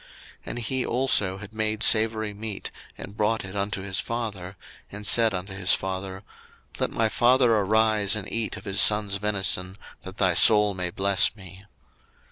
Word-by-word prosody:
01:027:031 - - -22 0.4
And - - -5
he 130 +2 -2
also 115 -7 0
had 105 +1 -12
made 110 0 -2
savoury 110 -1 +3
meat, 105 -1 -7 0.3
and 100 - -10
brought 105 0 -1
it 95 +1 -10
unto 100 -1 -3
his 95 -1 -2
father, 105 -6 -6 0.4
and 105 +1 -9
said 115 +2 +5
unto 95 +1 -6
his 95 -1 +2
father, 95 0 -6 0.6
Let - - -1
my 115 - -1
father 120 +1 +2
arise, 110 0 +1
and 105 -3 -5
eat 115 -1 -3
of - - -13
his 95 -1 +2
son's 105 -2 +4
venison, 95 -2 -1 0.2
that 95 +1 -11
thy 95 -3 +1
soul 105 +2 +4
may 90 -1 -4
bless 100 +3 +1
me. 95 -1 -14
105 Hz, 170 wpm, -24 LUFS, 95-110 Hz, 0.6 s, said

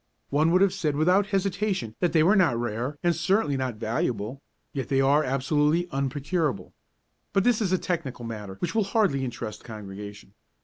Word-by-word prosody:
One 150 +3 +3
would 180 +2 +4
have 195 - +3
said 150 -4 -1
without 180 +7 +3
hesitation 195 - -1
that 175 - +1
they 160 -2 +4
were 190 +6 +5
not 170 - +3
rare 120 +5 -3
and 175 -1 +3
certainly 160 -2 +1
not 130 -3 -2
valuable, 115 +2 -2 0.3
yet 135 -2 -3
they 135 - +1
are 140 +3 +4
absolutely 150 +5 +1
unprocurable. 140 - -2 0.6
But 195 - +3
this 240 -1 +3
is 195 -4 0
a 185 - +3
technical 155 -10 -3
matter 105 -4 -6
which 170 - -3
will 220 -1 +2
hardly 195 -10 +1
interest 115 -4 -5
Congregation. 105 -2 -9
145 Hz, 175 wpm, -26 LUFS, 120-180 Hz, 0.6 s, were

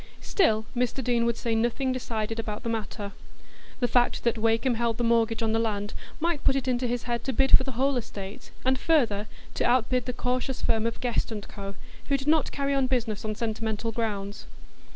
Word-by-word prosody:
Still, 220 - +2
Mr 250 +2 0
Deane 235 -1 +2
would 235 -1 0
say 230 -1 -1
nothing 240 +4 +1
decided 225 -3 -2
about 215 0 -4
the 230 - -2
matter; 210 -2 -3 0.7
the 245 - +2
fact 245 +1 +2
that 235 - +2
Wakem 225 +3 +2
held 230 -1 0
the 240 - -1
mortgage 230 -1 +2
on 220 - +2
the 225 - +2
land 205 -2 -1 0.3
might 330 -2 0
put 270 - +4
it 270 -1 -1
into 250 0 +1
his 240 0 -1
head 235 -1 -2
to 270 - -1
bid 270 +1 +5
for - - +5
the 265 -1 -4
whole 270 +3 +2
estate, 200 -4 -6 0.2
and 260 0 +3
further, 225 -10 +2 0.3
to - - -1
outbid 250 0 +2
the - - +1
cautious 250 +1 -1
firm 225 -1 +1
of 230 - -4
Guest 240 -1 0
& - - -12
Co., 200 -1 -7 0.3
who 280 - +3
did 270 +1 -7
not 315 0 +3
carry 280 0 0
on 270 -2 +2
business 235 -5 -1
on 215 -1 -2
sentimental 225 0 -2
grounds. 210 -3 -3
235 Hz, 210 wpm, -27 LUFS, 220-255 Hz, 0.7 s, bid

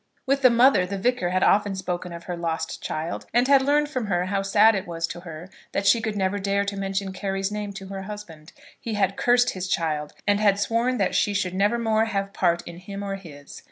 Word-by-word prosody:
With 275 0 +1
the 255 - +7
mother 235 -6 +4
the 200 +1 -4
Vicar 215 -3 0
had 185 +1 +1
often 205 -1 +3
spoken 180 -1 -4
of 170 0 -8
her 180 - -4
lost 165 -1 -3
child, 160 +2 -4
and 245 +1 +4
had 275 -1 +6
learned 295 +2 +2
from 255 -7 -3
her 180 -2 0
how 195 +1 -1
sad 210 +3 +5
it 195 -4 -3
was 165 -1 -2
to 175 - -7
her 170 -1 -9 0.3
that 200 - -1
she 225 +4 +5
could 220 -2 -3
never 195 0 0
dare 200 +1 0
to 200 0 -3
mention 195 0 -3
Carry's 195 0 -2
name 210 -1 -4
to 195 -1 -8
her 195 -1 -5
husband. 190 -6 -9 0.3
He 225 -2 -4
had 195 -1 +1
cursed 245 0 +3
his 185 -1 -5
child, 155 -5 -1
and 205 0 +2
had 200 -2 +3
sworn 230 +5 0
that 195 -4 0
she 205 - +1
should 185 -3 -1
never 205 +5 +2
more 220 -1 +1
have 195 -3 -3
part 175 -2 +1
in 170 0 -8
him 200 +2 -7
or 200 -1 -3
his. 155 -7 -10
195 Hz, 235 wpm, -24 LUFS, 180-215 Hz, 0.3 s, the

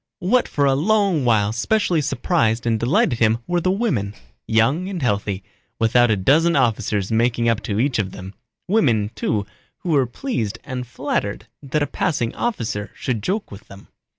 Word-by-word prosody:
What 240 +7 +2
for 145 - 0
a 135 - +4
long 190 -1 +2
while 110 -3 +2
specially 175 - +1
surprised 120 -6 0
and 115 -2 +1
delighted 120 0 +2
him 110 -1 +3
were 175 0 0
the 185 - +1
women, 175 - -1 0.3
young 135 +12 +2
and 190 -3 -4
healthy, 105 - -1 0.3
without 120 +2 +3
a 110 - +2
dozen 155 - +3
officers 110 -6 0
making 115 +1 +1
up 115 -1 +1
to 105 -2 -2
each 130 -1 +1
of 100 -3 -1
them; 95 +1 -9 0.3
women, 120 - +2
too, 105 -2 -1 0.4
who 180 - -5
were 140 -5 +3
pleased 120 - -3
and 125 -1 -5
flattered 110 -5 -3 0.2
that 145 +1 -1
a - - +1
passing 135 -8 -1
officer 115 - -3
should 120 -5 -2
joke 200 - -2
with 100 +2 -11
them. 100 0 -14
120 Hz, 175 wpm, -21 LUFS, 110-165 Hz, 0.4 s, a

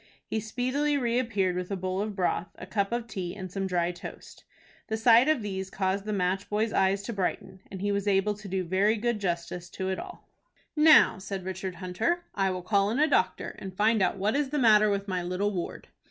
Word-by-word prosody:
He 220 - -2
speedily 255 +7 -1
reappeared 230 -7 0
with 180 0 -3
a 200 - -1
bowl 185 +1 -2
of 210 -1 -3
broth, 180 -2 0
a - - -9
cup 200 +1 -1
of 235 -1 -1
tea, 190 -6 -5
and 185 -3 -7
some 195 0 -2
dry 175 -1 0
toast. 175 - -11 0.4
The 220 - -2
sight 230 +3 +6
of 310 -7 +2
these 190 -2 -4
caused 195 +1 -1
the 215 - -3
match 190 0 -1
boy's 215 +1 0
eyes 195 +1 +2
to 235 - -4
brighten, 190 -1 -3
and 190 -1 -7
he 205 0 0
was 200 0 -1
able 200 +1 +2
to 205 0 -11
do 190 0 -1
very 190 +5 +2
good 235 0 -1
justice 175 -1 -3
to 190 +1 -3
all. - - -11 0.5
"Now," 310 -9 +6
said 190 -1 -5
Richard 190 0 -4
Hunter, 210 - -1
"I 195 -1 +1
will 185 -1 -4
call 200 +1 +2
in 230 - -1
a 300 - +5
doctor, - - 0
and 190 -2 -8
find 220 0 +3
out 190 - +1
what 205 +5 0
is 285 -1 0
the 295 - -2
matter 215 -5 +5
with 200 0 -1
my 185 -2 -1
little 185 +4 -1
ward." 175 -2 -5
200 Hz, 220 wpm, -28 LUFS, 185-220 Hz, 0.5 s, sight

